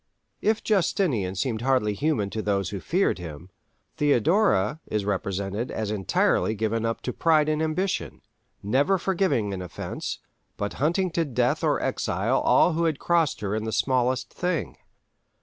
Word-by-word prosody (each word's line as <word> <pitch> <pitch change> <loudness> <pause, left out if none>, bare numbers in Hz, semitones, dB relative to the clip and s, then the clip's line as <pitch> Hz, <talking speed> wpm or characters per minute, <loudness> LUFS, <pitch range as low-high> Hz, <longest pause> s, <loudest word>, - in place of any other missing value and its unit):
If 215 +1 +1
Justinian 160 - +1
seemed 115 +1 -2
hardly 125 -5 +2
human 105 -4 0
to 110 - -3
those 100 -3 -1
who 100 - -4
feared 180 - +1
him, 85 +1 -9 0.5
Theodora 145 - +2
is 105 -2 -2
represented 100 +3 -2
as 110 -2 -3
entirely 105 +2 +1
given 110 +1 -1
up 115 - -3
to 125 - -3
pride 155 -2 +3
and 155 0 0
ambition, 180 +5 -2 0.4
never 140 - +2
forgiving 175 - 0
an 95 - -4
offence, 90 - -5 0.4
but 100 0 -3
hunting 175 +5 +1
to 165 0 +1
death 140 -7 0
or - - +2
exile - - 0
all 175 - +4
who 165 +1 +1
had 160 -3 +1
crossed 170 -2 +1
her 100 -1 -2
in 110 0 -2
the 110 - -2
smallest 130 +1 0
thing. 180 -3 -2
125 Hz, 155 wpm, -25 LUFS, 105-165 Hz, 0.5 s, all